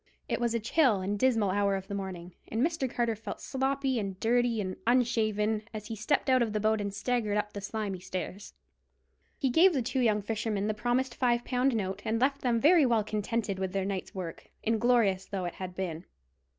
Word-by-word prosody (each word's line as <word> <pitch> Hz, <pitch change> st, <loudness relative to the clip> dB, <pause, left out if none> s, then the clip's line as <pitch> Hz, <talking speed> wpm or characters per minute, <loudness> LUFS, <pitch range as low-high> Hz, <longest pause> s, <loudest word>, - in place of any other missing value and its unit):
It -, -, -1 dB
was 235 Hz, -1 st, +1 dB
a -, -, +1 dB
chill 235 Hz, -1 st, +3 dB
and 200 Hz, +2 st, -2 dB
dismal 225 Hz, -6 st, +3 dB
hour 200 Hz, 0 st, +2 dB
of 190 Hz, 0 st, -5 dB
the 200 Hz, -, -5 dB
morning, 185 Hz, -3 st, -5 dB
and 230 Hz, +5 st, +1 dB
Mr. 320 Hz, -6 st, -1 dB
Carter 235 Hz, -1 st, 0 dB
felt 215 Hz, -1 st, -7 dB
sloppy 270 Hz, -1 st, -1 dB
and 195 Hz, -3 st, -4 dB
dirty 240 Hz, 0 st, +2 dB
and 185 Hz, -2 st, -3 dB
unshaven, 220 Hz, -3 st, +2 dB
as 215 Hz, -1 st, -5 dB
he 225 Hz, -, -3 dB
stepped 220 Hz, +9 st, 0 dB
out 260 Hz, -1 st, +4 dB
of 225 Hz, -3 st, 0 dB
the 215 Hz, -, 0 dB
boat 215 Hz, 0 st, +2 dB
and 200 Hz, -1 st, -2 dB
staggered 210 Hz, 0 st, -1 dB
up 210 Hz, 0 st, -2 dB
the 200 Hz, -, -5 dB
slimy 200 Hz, -2 st, -3 dB
stairs. 185 Hz, +2 st, -6 dB, 0.8 s
He 270 Hz, -6 st, 0 dB
gave 350 Hz, +7 st, +6 dB
the 265 Hz, -5 st, 0 dB
two 260 Hz, +3 st, -1 dB
young 215 Hz, -4 st, +2 dB
fishermen 215 Hz, -1 st, -1 dB
the 215 Hz, -, 0 dB
promised 240 Hz, +3 st, 0 dB
five 240 Hz, -1 st, +1 dB
pound 255 Hz, 0 st, +1 dB
note, 195 Hz, -2 st, -2 dB
and 225 Hz, +1 st, 0 dB
left 275 Hz, +2 st, +1 dB
them 240 Hz, -2 st, +2 dB
very 315 Hz, +5 st, +6 dB
well 235 Hz, -4 st, +3 dB
contented 215 Hz, -1 st, -2 dB
with 190 Hz, -1 st, -2 dB
their 195 Hz, -1 st, 0 dB
night's 195 Hz, -1 st, -4 dB
work, 180 Hz, -3 st, -6 dB
inglorious 225 Hz, -4 st, +2 dB
though 190 Hz, -3 st, -3 dB
it 175 Hz, -, -3 dB
had 185 Hz, -1 st, -7 dB
been. 175 Hz, -2 st, -4 dB
220 Hz, 210 wpm, -30 LUFS, 200-245 Hz, 0.8 s, gave